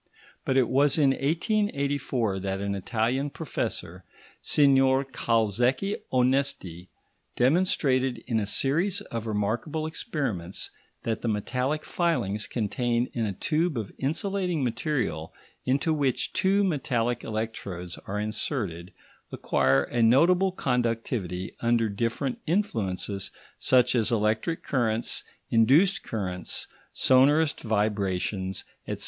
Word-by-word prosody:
But 130 - +1
it 130 -3 +4
was 140 +3 +3
in 140 -3 +4
1884 140 - 0
that 95 0 -3
an 100 0 -2
Italian 120 +7 -1
professor, 95 - -4 0.4
Signor 135 -1 +4
Calzecchi 120 - +1
Onesti, 125 -9 0 0.5
demonstrated 130 -3 +2
in 115 -3 0
a 105 - -2
series 170 - +1
of 115 -1 -5
remarkable 110 +9 -1
experiments 140 - -3 0.3
that 110 -2 -2
the - - -2
metallic 125 +7 -1
filings 115 - 0
contained 120 +2 -1
in 115 -2 -1
a - - -1
tube 155 - 0
of 105 -4 -4
insulating 175 +2 -1
material, 120 - -2 0.3
into 140 +5 +1
which 140 -5 0
two 195 +2 +3
metallic 125 -9 0
electrodes 100 -5 -5
are 105 +2 -2
inserted, 105 - -3 0.4
acquire 70 0 +2
a 120 - -2
notable 170 +11 +5
conductivity 115 - -2
under 115 -1 +2
different 115 +5 -2
influences 105 - -1 0.3
such 125 -1 +4
as 120 -1 +1
extra 110 +7 +1
currents, 120 -7 0 0.3
induced 140 - +4
currents, 95 -5 -3 0.3
sonorous 145 +4 +4
vibrations, 100 -3 -1 0.2
etc. - - -4
120 Hz, 110 wpm, -27 LUFS, 105-145 Hz, 0.5 s, notable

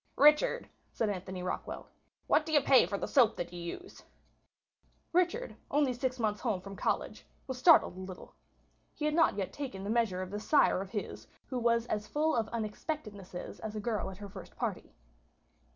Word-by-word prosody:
"Richard," 300 - +5 0.2
said 220 -3 0
Anthony 185 -1 -5
Rockwall, 180 - -4 0.4
"what - - +4
do 320 - -6
you 300 - +6
pay 260 -10 +6
for 200 +2 -2
the - - -3
soap 240 -5 +4
that 175 0 -5
you 175 - -6
use?" 360 - -7 1.1
Richard, 365 +8 +1
only 285 -3 +2
six 255 +1 -2
months 215 -3 -1
home 220 -7 0
from 195 +2 -9
college, 190 - -2 0.2
was 260 -1 -5
startled 325 - +6
a - - -9
little. 185 -1 -9 0.6
He 300 - -3
had 300 - +1
not 325 -9 +4
yet 195 -2 -3
taken 250 -10 -5
the 200 - -2
measure 220 -6 +1
of 185 - -8
this 205 +1 -5
sire 290 -10 +5
of 195 - -6
his, 205 -1 -5 0.2
who 255 - -3
was 235 -1 +2
as 215 -3 -2
full 310 +4 +1
of 225 -2 +1
unexpectednesses 215 - -5
as 220 -1 -6
a - - -2
girl 215 -1 -1
at 190 - -9
her 205 0 -8
first - - -11
party. - - -3
220 Hz, 190 wpm, -32 LUFS, 195-280 Hz, 1.1 s, you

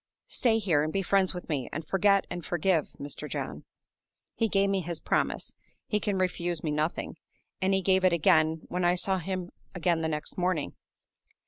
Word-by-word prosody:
Stay 230 -3 +3
here, 180 -9 +2
and 155 +1 -1
be 195 +2 0
friends 190 0 +3
with 180 -1 -7
me, 140 -7 -2
and 155 +1 -5
forget 200 +1 +3
and 175 - -4
forgive, 175 -2 +1
Mr. 145 +1 -6
John.' - - -5 0.7
He 225 - +1
gave 200 -1 +2
me 195 -1 +1
his 170 -1 -3
promise - - -1 0.3
(he 210 - 0
can 205 -1 -1
refuse 175 -2 -1
me 155 - -1
nothing); 150 +2 -2 0.4
and 190 +1 +2
he 190 - 0
gave 190 0 +3
it 185 - +5
again 160 -2 +3
when 180 0 -2
I 175 0 +4
saw 190 +1 +1
him 185 0 -4 0.2
again 170 -1 +1
the 160 - 0
next 150 +3 -4
morning. 180 -5 0
180 Hz, 190 wpm, -28 LUFS, 160-190 Hz, 0.7 s, it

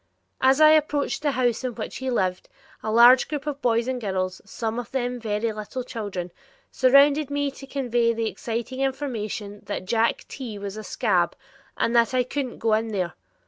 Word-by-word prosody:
As 265 +2 +4
I 310 0 +8
approached 295 -2 +1
the 290 -2 0
house 245 -1 0
in 250 -3 -3
which 220 - -5
he 260 0 -3
lived, 185 -7 -1 0.3
a 215 - -3
large 240 +3 +7
group 295 -1 -4
of 290 -2 -4
boys 230 0 +1
and 255 -1 -2
girls, 185 -3 -2
some 225 +3 -4
of 240 -1 -7
them 245 -1 -2
very 220 0 -1
little 215 +5 -5
children, 200 -7 -5 0.4
surrounded 280 +3 +5
me 285 0 -1
to 270 0 -12
convey 240 -4 +1
the 230 0 -2
exciting 230 +5 -4
information 225 -7 -3
that - - -4
"Jack 230 +3 +1
T. 240 -6 -7
was 200 0 -6
a 215 - -7
'scab'," - - +1 0.4
and 235 - +1
that 235 +2 +3
I 250 - +3
couldn't 260 0 -4
go 225 -1 +1
in 220 +1 +1
there. 185 -6 -2
240 Hz, 185 wpm, -24 LUFS, 215-265 Hz, 0.4 s, I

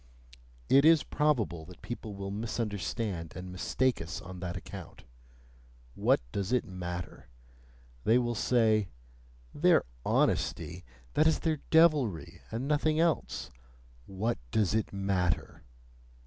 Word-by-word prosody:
It 140 - +6
is 160 -1 +6
probable 110 - 0
that 90 +1 -14
people 110 -3 -6
will 100 0 -5
misunderstand 105 -4 -3
and 90 0 -7
mistake 125 +7 0
us 80 0 -5
on 90 0 -9
that 90 -1 -4
account: - - -10 0.9
what - - +2
does 100 +1 -2
it 125 -2 +2
matter! 90 -6 -6 0.8
They 115 - +5
will 120 -1 0
say: 110 -4 +2 0.6
"Their - - +4 0.2
'honesty' 90 +1 0 0.3
that 155 - +4
is 160 - +3
their 160 -3 -1
devilry, 145 - +3
and 120 +5 -3
nothing 155 +1 +2
else!" 165 -1 0 0.6
What 105 +5 -2
does 105 - +1
it 110 -1 0
matter! 95 -4 -1
105 Hz, 120 wpm, -30 LUFS, 90-130 Hz, 0.9 s, It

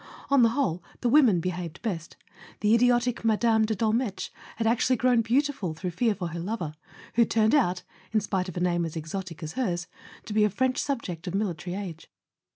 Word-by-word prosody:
On 280 -2 +6
the 230 - +6
whole 185 - -1 0.2
the 245 - +2
women 245 - +5
behaved 175 -1 -4
best: 175 -8 -4 0.4
the 210 +1 +4
idiotic 245 0 +3
Mme. 220 0 +3
de 220 0 -1
Dolmetsch 220 0 -1 0.2
had 225 - -2
actually 235 +3 +3
grown 250 -1 +3
beau¬ 245 +6 +2
tiful 200 - -4
through 180 +2 -3
fear 220 +5 +1
for 180 -4 -4
her 170 +1 -5
lover, 175 -4 -3 0.4
who 235 - +5
turned 220 -1 +2
out 185 -12 +2 0.3
(in 220 - +3
spite 190 -2 -2
of 180 - -8
a - - -1
name 175 -1 +1
as 165 -1 -4
exotic 165 +1 -5
as 155 - -5
hers) 180 -9 -1 0.4
to 215 - -5
be 210 0 +4
a 210 - +4
French 255 +6 0
sub¬ 275 -5 -2
ject 175 0 -6
of 180 - -2
military 180 -3 -2
age. 180 -5 -7
210 Hz, 205 wpm, -27 LUFS, 175-235 Hz, 0.4 s, On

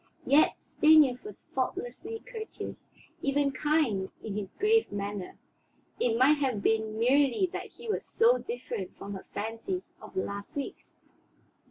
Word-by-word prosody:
Yet 295 +3 +5
Stanief 305 -5 +5
was 420 - -9
faultlessly 455 -2 -3
courteous, 450 -3 -7 0.3
even 280 0 +2
kind 265 -9 +1
in 210 -3 -4
his 200 -2 -5
grave 445 +2 +3
manner. 200 -2 -4 0.6
It 230 -2 +2
might 285 +4 +5
have 255 -8 0
been 220 -1 +1
merely 265 +6 +4
that - - -4
he - - -12
was 430 - -1
so 470 +2 +4
different 475 0 -5
from 200 +1 -6
her 190 - -8
fancies 230 - -4
of - - -12
the 380 - +1
last 200 0 -6
weeks. 285 - -6
275 Hz, 145 wpm, -29 LUFS, -, 0.6 s, Yet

